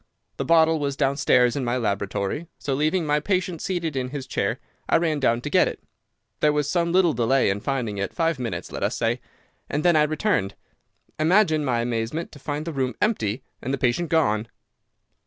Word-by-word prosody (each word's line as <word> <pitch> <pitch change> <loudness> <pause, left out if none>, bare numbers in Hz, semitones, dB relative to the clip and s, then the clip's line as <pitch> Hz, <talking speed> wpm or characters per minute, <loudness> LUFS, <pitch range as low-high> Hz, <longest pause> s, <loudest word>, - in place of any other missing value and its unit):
The - - -2
bottle 160 -1 +4
was 140 -1 -2
downstairs 135 -3 +3
in 140 - -1
my 120 +1 0
laboratory, 100 - -2
so 140 - -3
leaving 155 +5 +1
my 150 0 +2
patient 180 0 -1
seated 170 -5 -2
in 130 -1 -2
his 135 -1 -5
chair, - - -1 0.3
I - - +5
ran 160 -3 0
down 120 -3 +2
to - - -4
get - - +5
it. - - -5 0.6
There 150 - +4
was 150 -1 0
some 170 +2 +1
little 175 -3 +4
delay 120 -1 +2
in 100 - -2
finding 115 -5 -2
it—five 165 - -1
minutes, 110 -9 -4
let - - -5
us - - 0
say—and 150 +3 -4
then 175 -2 +5
I 155 - +5
returned. 150 - 0 0.6
Imagine 160 -1 +3
my 120 -4 +1
amazement 120 +7 -2
to 145 - -13
find 145 +2 -4
the 165 - -4
room 130 -4 -1
empty 130 - 0 0.2
and 130 - -3
the 140 - 0
patient 130 +7 0
gone. 115 -9 +2
145 Hz, 190 wpm, -24 LUFS, 120-160 Hz, 0.6 s, I